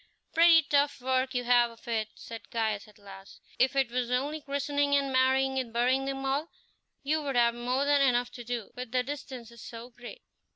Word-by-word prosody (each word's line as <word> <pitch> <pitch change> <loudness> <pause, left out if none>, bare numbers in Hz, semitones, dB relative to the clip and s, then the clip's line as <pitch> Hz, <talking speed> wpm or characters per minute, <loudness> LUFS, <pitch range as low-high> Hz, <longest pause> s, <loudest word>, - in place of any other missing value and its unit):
"Pretty 330 -1 +6
tough 285 0 +1
work 260 +1 0
you 245 - 0
have 240 -1 +4
of 230 0 -17
it," 220 -2 -1
said 225 -2 -10
Caius 220 -3 -2
at 210 - -19
last; 195 -1 -13 0.2
"if 260 +2 +3
it 265 -3 +1
was 245 -1 -1
only 285 +5 -1
christening 285 0 0
and 275 -1 +1
marrying 265 +1 +2
and 245 -3 -4
burying 250 +3 +1
them 270 0 -4
all, 280 +5 -1 0.5
you 310 +3 0
would 280 -3 -3
have 235 -1 +4
more 250 +3 -1
than 285 0 +3
enough 245 -2 +2
to 240 - -9
do, 235 -3 -5
with 250 -2 -7
the 250 0 +1
distances 250 -4 -8
so 235 +1 -9
great." 245 - -11
255 Hz, 200 wpm, -29 LUFS, 235-275 Hz, 0.5 s, Pretty